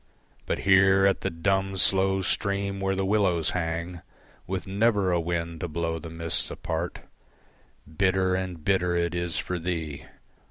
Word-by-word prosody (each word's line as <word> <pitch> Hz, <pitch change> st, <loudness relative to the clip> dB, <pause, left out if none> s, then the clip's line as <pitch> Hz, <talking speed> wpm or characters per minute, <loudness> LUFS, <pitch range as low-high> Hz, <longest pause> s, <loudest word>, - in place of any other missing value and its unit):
But -, -, 0 dB
here 95 Hz, 0 st, +5 dB
at 100 Hz, -, +2 dB
the -, -, -1 dB
dumb, 95 Hz, +3 st, -1 dB
slow 95 Hz, +1 st, +3 dB
stream 100 Hz, +1 st, -1 dB
where 95 Hz, 0 st, 0 dB
the 95 Hz, 0 st, -1 dB
willows 95 Hz, -5 st, +1 dB
hang, 85 Hz, 0 st, -3 dB, 0.5 s
With 95 Hz, 0 st, -3 dB
never 100 Hz, -1 st, +2 dB
a 85 Hz, -, +2 dB
wind 85 Hz, -1 st, -3 dB
to 90 Hz, -, -3 dB
blow 80 Hz, 0 st, -2 dB
the 80 Hz, +1 st, -8 dB
mists 80 Hz, 0 st, -1 dB
apart, 80 Hz, +2 st, -4 dB, 0.8 s
Bitter 95 Hz, +3 st, +1 dB
and 90 Hz, -4 st, -4 dB
bitter 90 Hz, -2 st, +2 dB
it 85 Hz, 0 st, 0 dB
is 85 Hz, -2 st, -2 dB
for 90 Hz, -1 st, -2 dB
thee. 80 Hz, -4 st, -4 dB
90 Hz, 155 wpm, -26 LUFS, 85-95 Hz, 0.8 s, here